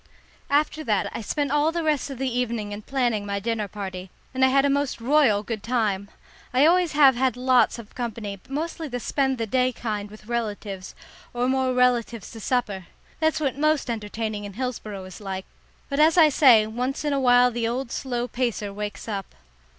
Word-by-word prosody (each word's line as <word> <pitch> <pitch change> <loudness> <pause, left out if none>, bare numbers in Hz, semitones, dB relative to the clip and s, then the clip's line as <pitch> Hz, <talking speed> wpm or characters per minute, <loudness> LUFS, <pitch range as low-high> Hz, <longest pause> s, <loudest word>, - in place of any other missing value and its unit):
After 300 +2 +1
that 210 -4 0
I - - -3
spent 285 +6 -2
all 295 +2 +3
the 340 0 -2
rest 300 -3 0
of 270 - -6
the 265 +1 -1
evening 235 -4 -2
in 205 +1 -6
planning 240 -4 0
my 200 0 -2
dinner 220 0 -2
party, 190 -2 -6 0.2
and 260 0 +1
I - - +7
had 275 +1 +3
a - - +4
most 280 -2 0
royal 240 -5 +3
good 220 -1 -4
time. 210 -5 -1 0.5
I 265 +3 +6
always 350 0 +3
have 280 -3 +6
had 255 -1 +1
lots 255 0 +3
of 225 -3 -11
company, 225 -4 -4
but 190 - -22
mostly 320 +2 -3
the 245 -2 -4
spend 265 +1 0
the 230 - -1
day 255 +3 +1
kind 210 -4 -4
with 215 0 -14
relatives, 210 -5 -4 0.4
or 245 +1 +1
more 260 0 +1
relatives 240 -4 +1
to 225 - -9
supper. 210 -6 -1 0.3
That's 315 0 +1
what 280 -2 -1
most 305 -4 +2
entertaining 215 -1 -4
in 200 -1 -7
Hillsboro 215 -4 -4
is 185 +2 -11
like, 190 -1 -5 0.4
but, 280 0 -2
as 315 +3 +5
I 320 -3 +8
say, 250 -7 +6
once 250 +7 -3
in 295 - +1
a 275 - +1
while 245 -1 +5
the 230 -1 -1
old 240 +1 -3
slow 245 -2 -2
pacer 235 -4 -2
wakes 210 +2 -6
up. 200 -3 -5
245 Hz, 200 wpm, -24 LUFS, 210-270 Hz, 0.5 s, I